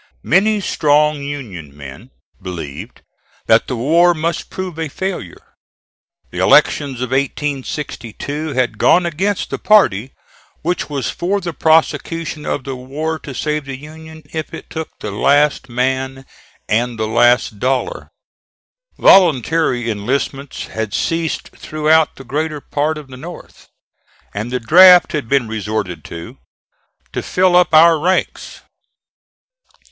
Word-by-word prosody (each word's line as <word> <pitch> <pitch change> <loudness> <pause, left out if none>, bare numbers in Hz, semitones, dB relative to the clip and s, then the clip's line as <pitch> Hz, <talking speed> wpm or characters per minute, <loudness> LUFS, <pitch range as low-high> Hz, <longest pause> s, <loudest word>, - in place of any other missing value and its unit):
Many 210 +5 +3
strong 150 -3 +2
Union 105 - -7
men 75 - -11 0.3
believed 85 -7 -8 0.4
that - - +3
the - - -3
war 170 +8 +3
must 165 +1 -3
prove 185 -3 -6
a 160 - -2
failure. 180 - -6 0.8
The - - -6
elections 135 -4 +3
of 125 0 -3
1862 140 +1 -3
had 125 -4 -1
gone 180 - +4
against 190 +5 -2
the - - -3
party 130 - +3 0.5
which 175 0 -2
was 140 -3 -2
for 195 +4 -1
the 175 -3 -5
prosecution 160 0 0
of 135 - -2
the 135 0 -5
war 150 +5 -4
to 135 - -9
save 150 0 -2
the 135 -1 -6
Union 160 +2 -12
if 160 -1 -5
it - - -12
took 160 -1 -5
the - - -4
last 145 -1 +2
man 130 +2 -2 0.4
and 120 +2 0
the 110 0 -1
last 120 -1 +2
dollar. 130 +2 -2 0.9
Voluntary 160 -7 +4
enlistments 130 +6 -3
had 110 -2 -4
ceased 165 -1 -2
throughout 155 +1 +1
the 135 - -11
greater 150 +3 -3
part 150 +2 -2
of 150 -2 -10
the 130 - -10
North, 170 +6 -11 0.7
and 105 +4 -4
the 125 - -1
draft 180 +9 +7
had 145 -8 -3
been 135 -4 +2
resorted 105 -6 -4
to 85 0 -9 0.7
to - - -2
fill 185 -1 +2
up 180 -2 +4
our 160 0 +6
ranks. 185 +4 -1
145 Hz, 130 wpm, -17 LUFS, 125-160 Hz, 0.9 s, draft